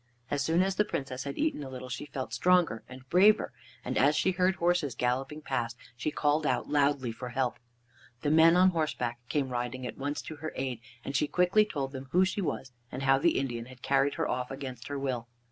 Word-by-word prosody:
As 145 Hz, -1 st, +1 dB
soon 165 Hz, +4 st, +3 dB
as 190 Hz, 0 st, -1 dB
the 210 Hz, -, +5 dB
Princess 130 Hz, -8 st, -4 dB
had 140 Hz, -, -5 dB
eaten 305 Hz, -, 0 dB
a 135 Hz, -, -7 dB
little 130 Hz, -1 st, -7 dB
she 125 Hz, +3 st, -5 dB
felt 135 Hz, -2 st, -5 dB
stronger 180 Hz, -11 st, +3 dB
and 130 Hz, 0 st, -11 dB
braver, 205 Hz, -, +5 dB, 0.3 s
and 130 Hz, -, 0 dB
as 145 Hz, +3 st, +4 dB
she 190 Hz, -, +2 dB
heard 185 Hz, +1 st, +2 dB
horses 170 Hz, -6 st, +1 dB
galloping 135 Hz, +5 st, -1 dB
past, 120 Hz, -4 st, -2 dB, 0.2 s
she 130 Hz, +5 st, -2 dB
called 150 Hz, +1 st, +1 dB
out -, -, 0 dB
loudly 140 Hz, -4 st, +2 dB
for 125 Hz, +2 st, -7 dB
help. 125 Hz, 0 st, -1 dB, 0.6 s
The 145 Hz, -, +2 dB
men 165 Hz, +2 st, +6 dB
on 185 Hz, +1 st, +6 dB
horseback 125 Hz, -8 st, -1 dB
came 140 Hz, -3 st, 0 dB
riding 125 Hz, +1 st, -3 dB
at -, -, -6 dB
once 145 Hz, +2 st, -3 dB
to 155 Hz, -, -8 dB
her 155 Hz, +2 st, -5 dB
aid, 130 Hz, -3 st, -3 dB, 0.3 s
and 135 Hz, -, -4 dB
she 150 Hz, -, +2 dB
quickly 180 Hz, +6 st, +4 dB
told 140 Hz, -9 st, -3 dB
them 135 Hz, -1 st, -7 dB
who 185 Hz, +2 st, +5 dB
she 190 Hz, +2 st, -2 dB
was, 140 Hz, -6 st, -3 dB, 0.2 s
and 130 Hz, -, -5 dB
how 135 Hz, 0 st, +4 dB
the 170 Hz, +3 st, +3 dB
Indian 120 Hz, -4 st, -2 dB
had 130 Hz, -1 st, -14 dB
carried 140 Hz, +1 st, +2 dB
her 160 Hz, -2 st, -1 dB
off 125 Hz, 0 st, -2 dB
against 130 Hz, -3 st, -7 dB
her 145 Hz, -, -3 dB
will. 130 Hz, -4 st, -2 dB
140 Hz, 220 wpm, -30 LUFS, 130-160 Hz, 0.6 s, men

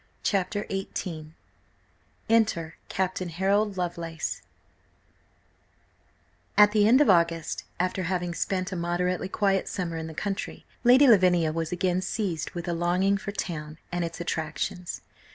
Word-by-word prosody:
CHAPTER 200 Hz, +1 st, 0 dB
XVIII 165 Hz, -5 st, -5 dB, 0.9 s
ENTER 215 Hz, -8 st, +2 dB, 0.2 s
CAPTAIN 185 Hz, -1 st, -1 dB
HAROLD 195 Hz, +4 st, +1 dB
LOVELACE 170 Hz, -2 st, -3 dB, 2.2 s
AT 210 Hz, 0 st, +8 dB
the 210 Hz, -1 st, +4 dB
end 255 Hz, +5 st, +6 dB
of 295 Hz, -, +4 dB
August, 170 Hz, -2 st, +1 dB
after 185 Hz, +1 st, 0 dB
having 175 Hz, 0 st, -1 dB
spent 185 Hz, +3 st, -2 dB
a -, -, -3 dB
moderately 180 Hz, +2 st, -1 dB
quiet 195 Hz, -1 st, +1 dB
summer 170 Hz, -4 st, -3 dB
in 160 Hz, 0 st, -4 dB
the 160 Hz, -, -9 dB
country, 200 Hz, +2 st, -4 dB, 0.2 s
Lady 255 Hz, +4 st, +7 dB
Lavinia 180 Hz, -7 st, +5 dB
was 165 Hz, -1 st, -2 dB
again 180 Hz, 0 st, 0 dB
seized 185 Hz, -3 st, -2 dB
with 175 Hz, +1 st, -5 dB
a 175 Hz, -, 0 dB
longing 180 Hz, +4 st, +2 dB
for 200 Hz, -, -5 dB
town 155 Hz, -6 st, -5 dB
and 175 Hz, 0 st, -1 dB
its 165 Hz, 0 st, -5 dB
attractions. 170 Hz, +1 st, -3 dB
180 Hz, 135 wpm, -27 LUFS, 170-195 Hz, 2.2 s, AT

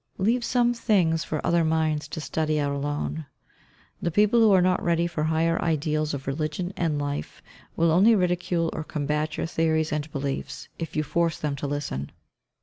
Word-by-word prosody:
Leave 230 Hz, +6 st, +1 dB
some 240 Hz, 0 st, +2 dB
things 180 Hz, -9 st, +2 dB
for 155 Hz, -, -3 dB
other 170 Hz, 0 st, +3 dB
minds 160 Hz, -1 st, 0 dB
to -, -, -6 dB
study 155 Hz, 0 st, -1 dB
out 145 Hz, -1 st, 0 dB
alone. 145 Hz, +2 st, -3 dB, 0.7 s
The -, -, 0 dB
people 210 Hz, +6 st, +3 dB
who 220 Hz, -2 st, +6 dB
are 190 Hz, -, +6 dB
not 180 Hz, 0 st, +2 dB
ready 170 Hz, 0 st, +1 dB
for 165 Hz, -3 st, -2 dB
higher 165 Hz, +1 st, +1 dB
ideals 155 Hz, -2 st, 0 dB
of 135 Hz, -, -7 dB
religion 155 Hz, +6 st, -3 dB
and 160 Hz, -4 st, 0 dB
life, 145 Hz, 0 st, -4 dB, 0.3 s
will 165 Hz, 0 st, +3 dB
only 200 Hz, +7 st, +6 dB
ridicule 180 Hz, -3 st, 0 dB
or 155 Hz, -, -4 dB
combat 150 Hz, 0 st, -2 dB
your -, -, -1 dB
theories 160 Hz, -1 st, 0 dB
and 150 Hz, 0 st, -3 dB
beliefs, 140 Hz, -1 st, -4 dB
if 165 Hz, -, -5 dB
you 155 Hz, -, +1 dB
force 170 Hz, +2 st, 0 dB
them 150 Hz, -2 st, -2 dB
to 145 Hz, -, -3 dB
listen. 140 Hz, -, -3 dB
160 Hz, 180 wpm, -25 LUFS, 150-175 Hz, 0.7 s, who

